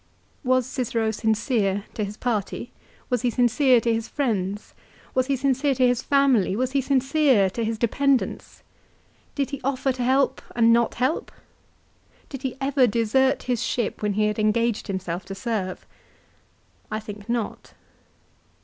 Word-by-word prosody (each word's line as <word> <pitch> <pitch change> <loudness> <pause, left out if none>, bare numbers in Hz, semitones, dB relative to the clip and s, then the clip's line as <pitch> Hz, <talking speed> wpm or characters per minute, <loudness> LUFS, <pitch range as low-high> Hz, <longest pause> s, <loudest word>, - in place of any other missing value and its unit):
Was 255 -1 +2
Cicero 230 -4 -1
sincere 220 -2 0
to 215 - -2
his 205 +1 -6
party, 220 -5 -3 0.4
was 245 -2 +1
he 245 - +1
sincere 245 +2 +4
to 230 0 +1
his 225 0 -2
friends, 205 -7 -2 0.4
was 255 0 +1
he 280 - +1
sincere 270 +1 +1
to 255 0 +3
his 245 -1 +2
family, 270 -9 +3
was 255 +3 -1
he 275 0 +1
sincere 265 -6 +3
to 230 - -3
his 225 0 -2
dependants? 265 +4 0 0.7
Did 280 -1 -1
he 280 - -5
offer 270 0 0
to 255 -1 -5
help 265 +2 +2
and 230 -1 +5
not 235 -1 +2
help? 255 +6 -1 1.0
Did 270 -3 -7
he 265 -1 -4
ever 270 -2 +3
desert 240 +5 +2
his 245 -3 -1
ship, 235 -4 -2
when 210 -1 0
he 210 +1 +1
had 210 0 -1
engaged 225 +1 +1
himself 185 -2 -3
to 195 0 -7
serve? 200 -4 -3 1.0
I 215 - -2
think 210 0 -10
not. 235 -3 -3
240 Hz, 155 wpm, -24 LUFS, 215-265 Hz, 1.0 s, and